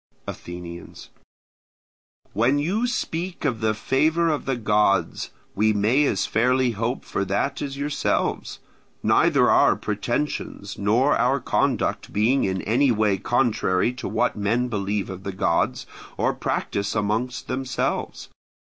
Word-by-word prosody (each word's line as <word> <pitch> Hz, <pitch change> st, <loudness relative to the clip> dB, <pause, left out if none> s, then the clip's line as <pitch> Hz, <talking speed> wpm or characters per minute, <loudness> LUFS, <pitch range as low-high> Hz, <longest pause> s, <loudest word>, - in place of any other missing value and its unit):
Athenians. 85 Hz, 0 st, -8 dB, 1.2 s
When 120 Hz, +7 st, +2 dB
you 195 Hz, +11 st, 0 dB
speak 175 Hz, -8 st, -3 dB
of 115 Hz, -6 st, -1 dB
the 110 Hz, -1 st, +1 dB
favour 155 Hz, +9 st, +1 dB
of 150 Hz, -2 st, -1 dB
the 135 Hz, -, 0 dB
gods, 105 Hz, -3 st, +1 dB, 0.2 s
we 110 Hz, +2 st, +2 dB
may 110 Hz, +8 st, +3 dB
as 100 Hz, -8 st, +1 dB
fairly 125 Hz, +2 st, +2 dB
hope 115 Hz, +4 st, -3 dB
for -, -, -2 dB
that 100 Hz, +8 st, -1 dB
as 140 Hz, -1 st, -4 dB
yourselves; 145 Hz, +1 st, -1 dB, 0.5 s
neither -, -, +4 dB
our -, -, +5 dB
pretensions 105 Hz, -1 st, -3 dB
nor 115 Hz, +8 st, +2 dB
our 135 Hz, +3 st, +2 dB
conduct -, -, 0 dB
being 115 Hz, +6 st, +2 dB
in 95 Hz, -1 st, -2 dB
any 130 Hz, +6 st, +2 dB
way 105 Hz, -3 st, +1 dB
contrary 115 Hz, -2 st, +1 dB
to 125 Hz, -, -6 dB
what 125 Hz, -, 0 dB
men 115 Hz, +5 st, 0 dB
believe 100 Hz, -2 st, -2 dB
of 95 Hz, 0 st, -8 dB
the 100 Hz, -, -4 dB
gods, 95 Hz, -, 0 dB, 0.3 s
or -, -, +1 dB
practise 100 Hz, +1 st, -2 dB
among 105 Hz, +4 st, 0 dB, 0.2 s
themselves. 130 Hz, 0 st, -3 dB
115 Hz, 130 wpm, -24 LUFS, 100-135 Hz, 1.2 s, our